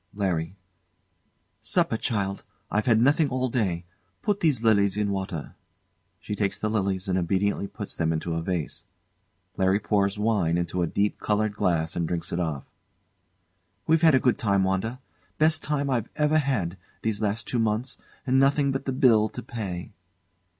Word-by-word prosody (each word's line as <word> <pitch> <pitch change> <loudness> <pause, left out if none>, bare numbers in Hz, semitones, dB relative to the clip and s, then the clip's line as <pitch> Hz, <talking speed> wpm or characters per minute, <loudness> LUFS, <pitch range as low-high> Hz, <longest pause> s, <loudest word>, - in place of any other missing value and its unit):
LARRY. 90 -4 -1 1.1
Supper, - - +1
child 100 -4 -2 0.3
I've 105 +3 0
had 115 -2 +5
nothing 145 +4 +4
all 130 0 -1
day. 95 -8 -1 0.4
Put 205 -1 +1
these 145 -8 +1
lilies 100 -3 +3
in 105 -1 0
water. 95 -5 -4 0.7
[She - - -5
takes 100 -2 -1
the 110 - -1
lilies 95 -3 -1
and 95 -1 +1
obediently 100 +3 0
puts - - -6
them 80 -1 0
into 80 +1 -2
a 80 - -1
vase. 85 -2 -3 0.7
LARRY 95 +1 +3
pours 100 -1 +1
wine 105 -6 +1
into 85 +1 -1
a 85 - +1
deep 100 +4 0
coloured 105 0 0
glass 85 -4 0
and 85 -2 -1
drinks 85 -1 -3
it 85 - -1
off.] 80 -6 -3 1.2
We've 160 0 +3
had 160 -4 +6
a - - +5
good 125 -1 +2
time, 100 -4 +2
Wanda. 95 +6 -1 0.4
Best 160 +1 +3
time 145 -2 -1
I 120 -4 +1
ever 150 +1 +3
had, 110 - -1 0.3
these 110 -1 -1
last 110 +2 -1
two 120 - 0
months; 115 +3 -1 0.3
and 130 0 +3
nothing 140 +1 +3
but 135 0 -3
the 135 - -1
bill 115 -5 +4
to 125 - -8
pay. 100 -7 -5
105 Hz, 170 wpm, -26 LUFS, 95-125 Hz, 1.2 s, had